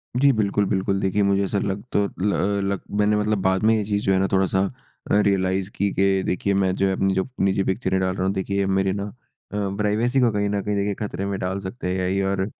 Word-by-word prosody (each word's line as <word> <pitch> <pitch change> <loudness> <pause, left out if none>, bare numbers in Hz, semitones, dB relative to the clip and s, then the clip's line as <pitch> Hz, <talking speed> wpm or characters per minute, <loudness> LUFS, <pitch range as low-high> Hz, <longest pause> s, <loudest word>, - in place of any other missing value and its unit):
जी, 140 +3 +5
बिल्कुल, 105 -3 +1
बिल्कुल। 95 0 0
देखिए 95 +2 +1
मुझे 100 0 +2
ऐसा 100 +1 -1
लग 100 0 -2
तो 100 - +2 0.6
लग 100 -1 -2 0.2
मैंने 105 0 +3
मतलब 105 0 +1
बाद 95 +1 +1
में 110 +1 +5
ये 110 - 0
चीज़ 105 0 -1
जो 95 - +3
है 95 - +3
ना 95 - +2
थोड़ा-सा 95 0 +2 0.5
रियलाइज़ 95 -2 +2
की 100 - +1
कि 95 0 +2
देखिए 100 +2 0
मैं 95 -1 +2
जो 95 0 +1
अपनी 95 0 +1
जो 95 0 0 0.2
निजी 95 0 +1
पिक्चरें 95 -1 0
डाल 95 0 0
रहा 95 - -1
हूँ 95 - +1
देखिए 100 0 -1
मेरी 95 0 +1
ना 100 0 -3
अ, 105 - -7 0.7
प्राइवसी 110 +5 +1
को 120 -2 +4
कहीं 105 -1 0
न 100 0 -1
कहीं 105 0 -1
देखे 100 0 0
खतरे 100 -1 -4
में 100 0 -2
डाल 95 +2 -2
सकते 95 +2 -6
हैं 95 +1 0
और 95 0 0
100 Hz, 230 wpm, -23 LUFS, 95-105 Hz, 0.7 s, जी